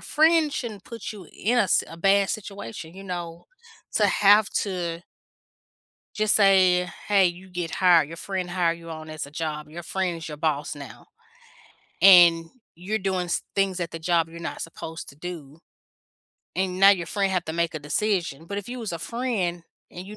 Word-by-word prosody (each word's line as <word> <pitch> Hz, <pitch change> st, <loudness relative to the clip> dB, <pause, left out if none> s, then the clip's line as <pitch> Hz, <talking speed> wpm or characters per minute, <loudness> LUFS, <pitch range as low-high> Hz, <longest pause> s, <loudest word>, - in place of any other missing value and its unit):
friend 315 Hz, -1 st, +3 dB
shouldn't 215 Hz, -8 st, -5 dB
put 230 Hz, -2 st, -7 dB
you 195 Hz, -6 st, -11 dB
in 240 Hz, +4 st, 0 dB
a -, -, +5 dB
s 195 Hz, -, +2 dB
a 165 Hz, -, -10 dB
bad 195 Hz, +2 st, +3 dB
situation, 190 Hz, -, -7 dB
you 195 Hz, +1 st, -10 dB
know, 175 Hz, -2 st, -6 dB, 0.5 s
to 210 Hz, -, +4 dB
have 205 Hz, +1 st, +5 dB
to 175 Hz, -4 st, -2 dB, 1.1 s
just 215 Hz, -1 st, +2 dB
say, 185 Hz, -3 st, +4 dB, 0.2 s
"Hey. 195 Hz, -2 st, +5 dB
You 180 Hz, +2 st, -5 dB
get 175 Hz, -2 st, -4 dB
hired. 175 Hz, -5 st, +5 dB
Your 165 Hz, -, -8 dB
friend 185 Hz, -1 st, -4 dB
hire 175 Hz, -2 st, +1 dB
you 165 Hz, 0 st, -10 dB
on 155 Hz, -1 st, -8 dB
as 155 Hz, -2 st, -5 dB
a 140 Hz, -, -13 dB
job. 150 Hz, -1 st, -4 dB
Your 170 Hz, +3 st, -8 dB
friend 180 Hz, 0 st, -2 dB
is 165 Hz, -1 st, -8 dB
your 150 Hz, -, -7 dB
boss 150 Hz, -1 st, -1 dB
now," 140 Hz, -2 st, -11 dB, 1.0 s
and 175 Hz, -3 st, +8 dB, 0.3 s
you're 200 Hz, +6 st, -3 dB
doing 185 Hz, -2 st, -1 dB
s 170 Hz, -, -1 dB
things 195 Hz, -2 st, +1 dB
at 170 Hz, -1 st, -3 dB
the 165 Hz, -, -6 dB
job 165 Hz, -1 st, +1 dB
you're 170 Hz, +1 st, -10 dB
not -, -, -5 dB
supposed 165 Hz, 0 st, -7 dB
to -, -, -14 dB
do, 155 Hz, -2 st, -8 dB, 1.0 s
and 185 Hz, -1 st, -1 dB
now 195 Hz, -, +9 dB
your 175 Hz, -4 st, +1 dB
friend 195 Hz, 0 st, 0 dB
have 180 Hz, -2 st, 0 dB
to 160 Hz, -, -3 dB
make 170 Hz, -1 st, -1 dB
a 155 Hz, -, -2 dB
decision, 165 Hz, 0 st, -2 dB
but 200 Hz, +3 st, -4 dB
if 205 Hz, -, -8 dB
you 250 Hz, +1 st, -5 dB
was 220 Hz, -6 st, -5 dB
a 170 Hz, -, -4 dB
friend 195 Hz, -5 st, -2 dB, 0.3 s
and 180 Hz, +2 st, -9 dB
you 210 Hz, +1 st, -9 dB
180 Hz, 195 wpm, -25 LUFS, 165-195 Hz, 1.1 s, now